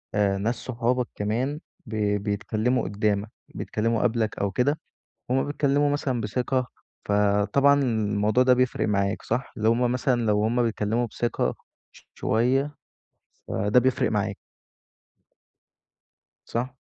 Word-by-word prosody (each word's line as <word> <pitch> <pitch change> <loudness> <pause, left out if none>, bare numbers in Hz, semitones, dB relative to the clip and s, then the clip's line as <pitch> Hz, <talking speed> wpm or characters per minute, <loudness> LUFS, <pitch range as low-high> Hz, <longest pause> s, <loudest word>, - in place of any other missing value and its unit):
آآ 100 -1 +2
ناس 110 +5 0
صحابك 125 0 -1
كمان 120 +8 -1 0.3
ب 110 - -6 0.3
بيتكلموا 110 +4 0
قدّامك، 100 +1 -1 0.3
بيتكلّموا 115 +1 -1
قبلك 115 -3 0
أو 100 -1 0
كده، 140 +9 +1 0.5
هُم 130 +1 +2
بيتكلموا 145 0 +1
مثلًا 135 -4 -1
بثقة، 125 +4 -1 0.4
فطبعًا 105 +8 +3
الموضوع 110 -1 +1
ده 130 0 +6
بيفرق 125 -3 +1
معاك، 100 -1 0
صح؟ 130 - -2
اللي 110 -1 +1
هُم 120 +1 +2
مثلًا 125 -1 +1
لو 105 0 +2
هُم 120 +2 +2
بيتكلموا 115 +1 0
بثقة 120 +1 -1 0.4
ش - - -19
شوية 135 +6 +1 0.7
فده 105 +5 +2
بيفرق 130 +1 +1
معاك. - - -1 2.1
صح؟ 125 +3 -3
115 Hz, 120 wpm, -25 LUFS, 105-130 Hz, 2.1 s, ده